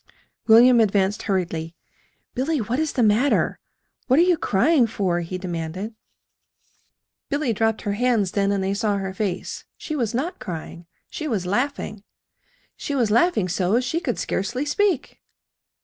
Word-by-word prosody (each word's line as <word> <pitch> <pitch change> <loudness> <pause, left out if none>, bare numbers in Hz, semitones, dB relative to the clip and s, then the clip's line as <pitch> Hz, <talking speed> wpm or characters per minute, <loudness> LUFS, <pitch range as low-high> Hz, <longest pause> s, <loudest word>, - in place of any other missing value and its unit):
William 240 +2 +7
advanced 200 -2 +2
hurriedly. 170 -4 -2 0.6
"Billy, 295 +5 0
what 240 +4 -2
is 315 -2 -1
the 245 - +1
matter? 225 +7 +2 0.5
What 260 +1 +4
are 335 - +7
you 360 -1 +4
crying 255 +1 +2
for?" 190 -5 -1
he 175 +2 -4
demanded. 180 +3 -5 1.4
Billy 285 -4 0
dropped 225 +1 0
her 205 - -1
hands 215 -3 +1
then, 200 -1 +1
and 200 -1 0
they 195 +1 0
saw 205 0 0
her 190 -1 -4
face. 190 -3 -3
She 310 - -5
was 235 -6 -1
not 315 +9 -2
crying. 170 -1 -7 0.2
She 320 -3 -4
was 210 -9 -1
laughing. 215 0 -2 0.7
She 285 - -4
was 235 -6 +1
laughing 235 - +3
so 185 +5 +1
she 255 +6 -1
could 370 - -2
scarcely 245 +9 -2
speak. 360 +1 0
220 Hz, 150 wpm, -23 LUFS, 190-260 Hz, 1.4 s, William